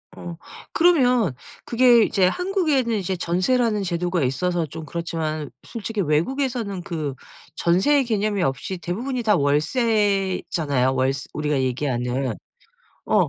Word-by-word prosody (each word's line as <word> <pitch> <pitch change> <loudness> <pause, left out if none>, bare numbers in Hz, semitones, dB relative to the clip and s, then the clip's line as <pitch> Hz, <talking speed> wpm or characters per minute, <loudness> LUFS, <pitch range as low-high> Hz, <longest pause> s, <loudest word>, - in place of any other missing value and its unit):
어 170 -1 -8 0.3
그러면 250 - +3 0.3
그게 240 -1 +5
이제 190 -3 +3
한국에는 310 - +1
이제 190 -1 -2
전세라는 210 +5 +1
제도가 175 -2 -1
있어서 170 +7 0
좀 155 +2 -8
그렇지만 155 -1 -3
솔직히 225 -2 -5
외국에서는 200 - -1
그 155 -5 -3 0.4
전세의 255 +12 +3
개념이 210 -3 0
없이 135 +5 -2
대부분이 235 - -3
다 210 -3 +4
월세잖아요. 170 - +1
월스 130 +1 0
우리가 150 -2 0
얘기하는. 130 -1 -1 0.7
어 - - +3
180 Hz, 300 characters per minute, -23 LUFS, 150-230 Hz, 0.7 s, 그게